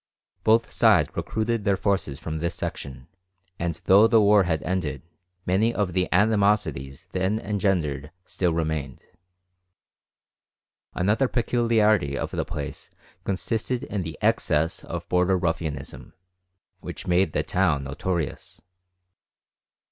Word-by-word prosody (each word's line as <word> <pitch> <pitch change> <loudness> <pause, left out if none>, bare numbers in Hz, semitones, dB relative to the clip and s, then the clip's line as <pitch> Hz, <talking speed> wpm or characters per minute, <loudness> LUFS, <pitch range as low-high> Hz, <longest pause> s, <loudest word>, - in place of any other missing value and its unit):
Both 115 +1 +3
sides - - +4
recruited 110 0 -1
their 100 -1 +2
forces 95 -9 -1
from 80 -1 -4
this 85 +2 -2
section, 65 -5 -6 0.5
and 85 -1 -1
though 100 +4 +7
the 115 - +5
war 105 -2 +5
had 80 -4 -1
ended, 80 -7 -2 0.4
many 100 +6 +2
of 100 -4 -1
the 90 0 0
animosities 100 -9 +1
then 95 +3 0
engendered 90 -10 -1 0.2
still 90 -2 -1
remained. 80 -5 -3 1.9
Another 105 +8 +2
peculiarity 110 - +2
of - - -3
the - - -1
place - - -6 0.4
consisted 115 +5 -2
in 105 - -3
the 80 -3 -6
excess 75 +2 +1
of - - -6
border 90 +1 +2
ruffianism, 75 -7 -4 0.7
which - - -8
made 90 +2 +2
the - - +1
town 70 -1 +1
notorious. 80 +3 -4
90 Hz, 120 wpm, -25 LUFS, 80-105 Hz, 1.9 s, though